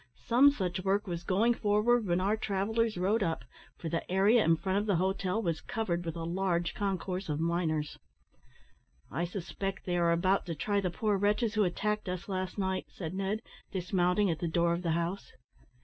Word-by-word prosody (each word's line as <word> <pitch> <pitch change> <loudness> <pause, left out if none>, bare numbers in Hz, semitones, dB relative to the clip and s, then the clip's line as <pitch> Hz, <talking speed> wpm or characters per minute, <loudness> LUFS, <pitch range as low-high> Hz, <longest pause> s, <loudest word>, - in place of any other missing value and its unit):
Some 255 +5 +6
such 185 -8 -2
work 200 +2 +1
was 175 -3 -4
going 210 +7 +3
forward 215 +1 +2
when 175 0 +2
our 200 +3 +2
travellers 220 +1 0
rode 200 +5 +1
up, 165 -9 -1 0.3
for 165 - -6
the 165 +2 -3
area 205 +5 +5
in 165 - +4
front 190 +4 0
of 210 - -3
the 200 - +3
hotel 190 +3 0
was 165 -3 -1
covered 220 -8 -2
with 165 - -3
a 165 - -4
large 175 0 0
concourse 190 -2 -2
of 150 0 -1
miners. 160 -2 -1 1.1
"I 165 +6 -1
suspect 195 +2 -5
they 175 -1 0
are 170 -1 +3
about 185 +3 +2
to 165 - -3
try 200 +6 0
the 185 - 0
poor 205 +3 0
wretches 210 +2 +1
who 215 -2 +3
attacked 210 +3 -1
us 180 0 -4
last 185 -1 -3
night," 190 -1 -1
said 165 -2 -6
Ned, 195 +3 -2 0.3
dismounting 180 +1 +1
at 160 - -3
the 170 - -1
door 170 +1 +2
of 170 - -2
the 170 -3 0
house. 170 +4 -3
190 Hz, 195 wpm, -31 LUFS, 170-205 Hz, 1.1 s, Some